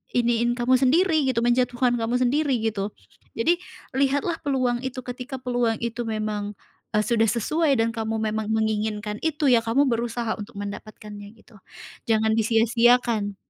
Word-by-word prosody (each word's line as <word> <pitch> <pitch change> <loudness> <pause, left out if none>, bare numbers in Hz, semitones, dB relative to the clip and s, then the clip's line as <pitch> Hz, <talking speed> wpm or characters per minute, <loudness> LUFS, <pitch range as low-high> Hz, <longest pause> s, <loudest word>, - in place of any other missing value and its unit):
iniin 240 0 +2
kamu 250 +1 +2
sendiri 310 +2 +3
gitu, 235 -3 +1
menjatuhkan 245 0 +2
kamu 230 +2 -1
sendiri 280 +2 +1
gitu. 210 -2 -2 0.4
Jadi 335 +10 +2 0.3
lihatlah 280 +5 0
peluang 255 -4 0
itu, 255 0 -5
ketika 250 +2 -6
peluang 245 -2 0
itu 235 0 -3
memang, 210 -1 -3 0.4
eee, 210 - +3
sudah 225 -1 +2
sesuai 280 +7 +1
dan 225 0 +2
kamu 225 0 -3 0.2
memang 220 -1 -3
menginginkan 215 -1 -1
itu, 310 -2 -1
ya 240 - +6
kamu 235 +6 +2
berusaha 235 -1 -1
untuk 205 - -9
mendapatkannya 205 +1 -8
gitu. 220 -2 -20 0.5
Jangan 220 0 +3
disia-siakan 230 -1 +2
235 Hz, 140 wpm, -24 LUFS, 220-255 Hz, 0.5 s, ya